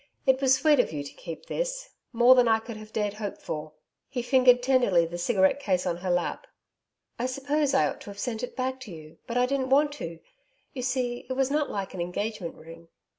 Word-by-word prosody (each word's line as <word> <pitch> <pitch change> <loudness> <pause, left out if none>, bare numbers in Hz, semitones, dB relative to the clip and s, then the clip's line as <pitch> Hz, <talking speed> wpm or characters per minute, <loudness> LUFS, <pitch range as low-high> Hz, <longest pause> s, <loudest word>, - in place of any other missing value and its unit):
It 265 -1 +3
was 265 -1 +5
sweet 295 +1 +4
of 245 - +2
you 145 -2 -4
to 140 - -9
keep 165 - -9
this - - -3 0.2
more 240 +1 +7
than 250 -2 +4
I 225 -1 +5
could 225 +1 -8
have 215 0 -11
dared 210 -2 -1
hope 210 -1 -5
for.' 155 0 -6 0.4
He 250 -3 -3
fingered 250 -1 +5
tenderly 245 -10 +3
the 170 +1 -6
cigarette 190 +5 +2
case 185 -9 0
on 175 -2 -1
her 180 +1 -4
lap. 175 0 -1 0.7
'I 245 - 0
suppose 275 +2 0
I 270 - +4
ought - - -6
to - - -10
have 200 - -9
sent 225 +1 -3
it 250 - -5
back 260 0 -2
to 250 -6 -10
you. 155 -2 -12
But 235 - -2
I 250 - +4
didn't 260 0 -1
want 290 +2 +4
to. 165 0 -5 0.6
You 255 - -5
see 250 -1 -2
it - - -1
was 270 +1 0
not 295 0 +1
like 195 -1 -4
an 185 - -4
engagement 185 +1 -4
ring.' 165 +1 -13
240 Hz, 225 wpm, -27 LUFS, 185-260 Hz, 0.7 s, more